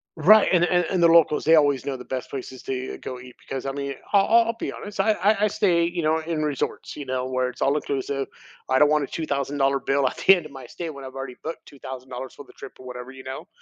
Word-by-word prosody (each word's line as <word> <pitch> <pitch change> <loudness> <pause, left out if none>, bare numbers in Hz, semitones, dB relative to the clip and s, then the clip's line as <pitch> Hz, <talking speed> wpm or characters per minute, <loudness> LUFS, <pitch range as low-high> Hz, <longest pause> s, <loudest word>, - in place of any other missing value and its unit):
Right. 205 +7 +6
And 175 - +4
and 175 -1 +2
and 180 -2 +1
the 170 - +7
locals, 165 -2 +5
they 160 +1 +6
always 145 -3 +2
know 135 - -2
the 125 - -10
best 130 -1 -5
places 130 -1 -7
to - - -5
e 130 0 -4
go 125 -1 -7
eat 125 -1 -13
because, 135 -1 -6
I 135 - -1
mean, 140 0 -4 0.2
I'll 200 -1 +5 0.2
I'll 230 - -1
be - - -3
honest. 205 0 -9
I 220 - +4
I 210 +1 +2
I - - +3
stay, 175 -5 +2
you 170 -1 -2
know, 160 +1 +2
in 160 -1 -3
resorts, 145 -3 -3
you 145 - -6
know, 130 0 -2
where 130 0 -1
it's - - -4
all 140 - +2
inclusive. 140 -2 -2 0.4
I 130 - +3
don't 150 +1 +5
want 150 -1 +2
a - - -4
$2,000 140 -2 -1
bill 135 0 +1
at - - -3
the 195 - +6
end 170 -4 -5
of 150 - -10
my 135 -2 -10
stay 170 -2 -6
when 140 -2 -10
I've 130 0 -9
already 135 -2 -6
booked 160 - -6
$2,000 130 -2 -8
for 145 - -11
the - - -18
trip - - -11
or 130 - -13
whatever, 125 0 -8
you 130 0 -12
know? 130 0 -7
140 Hz, 270 wpm, -24 LUFS, 130-165 Hz, 0.4 s, the